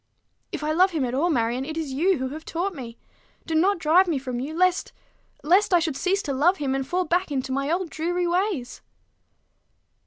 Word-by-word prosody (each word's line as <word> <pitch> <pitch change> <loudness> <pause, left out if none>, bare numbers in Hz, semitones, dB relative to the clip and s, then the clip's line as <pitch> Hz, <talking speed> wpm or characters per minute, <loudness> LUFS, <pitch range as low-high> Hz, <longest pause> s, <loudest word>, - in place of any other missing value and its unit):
"If - - -5
I 305 - 0
love 365 +4 +4
him 315 -7 -1
at 245 - -3
all, 305 +7 +1
Marion, 240 -3 0
it 315 +3 -6
is 305 -5 -3
you 350 +6 +2
who 260 0 -3
have 310 +3 -8
taught 360 +5 -3
me. 240 -6 -9 0.5
Do 325 - -4
not 380 +6 +3
drive 335 +4 +4
me 325 -5 0
from 255 -2 -4
you 275 +5 -4
lest 365 0 +1 0.5
lest 365 +4 +4
I - - +5
should 320 -4 -2
cease 390 +7 0
to 285 - -2
love 335 +8 +3
him, 275 -4 -1
and 270 -1 -2
fall 360 +3 0
back 350 +1 0
into 265 -1 -2
my 275 +2 -1
old 345 0 -1
dreary 350 +3 -1
ways." 350 - -1
315 Hz, 215 wpm, -24 LUFS, 270-360 Hz, 0.5 s, I